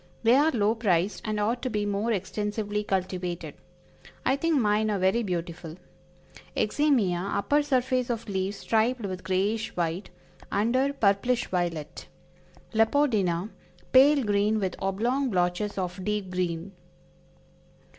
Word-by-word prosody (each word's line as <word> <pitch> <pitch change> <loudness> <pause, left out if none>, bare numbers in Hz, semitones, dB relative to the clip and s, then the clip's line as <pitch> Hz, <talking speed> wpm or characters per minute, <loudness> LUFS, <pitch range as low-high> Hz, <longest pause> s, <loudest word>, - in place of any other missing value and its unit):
They 230 +1 +5
are 295 +3 +4
low 220 -6 +2
priced, 200 -4 0
and 215 -1 -1
ought 230 +4 0
to 255 - -2
be 210 -2 -1
more 205 +3 -1
extensively 210 +1 -2
cultivated. 185 -3 -3 0.7
I 265 - +3
think 320 +1 +1
mine 215 -1 +2
are 205 - 0
very 190 +5 +2
beautiful. 170 -4 -4 0.8
Eximia, 215 -8 +2
upper 290 +8 +2
surface 255 -3 0
of 235 -1 -3
leaves 195 0 -2
striped 230 +4 +1
with 185 -2 -5
grayish 200 +4 -1
white; 175 +2 -2 0.4
under, 250 +7 +2
purplish 240 0 +1
violet. 170 -4 -3 0.7
Leopordina, 220 -6 +2 0.4
pale 275 +2 +6
green 210 +1 +1
with 190 -3 -2
oblong 235 +8 0
blotches 180 +1 0
of 185 0 -3
deep 210 -2 -2
green. 180 0 -2
210 Hz, 125 wpm, -27 LUFS, 185-235 Hz, 0.8 s, pale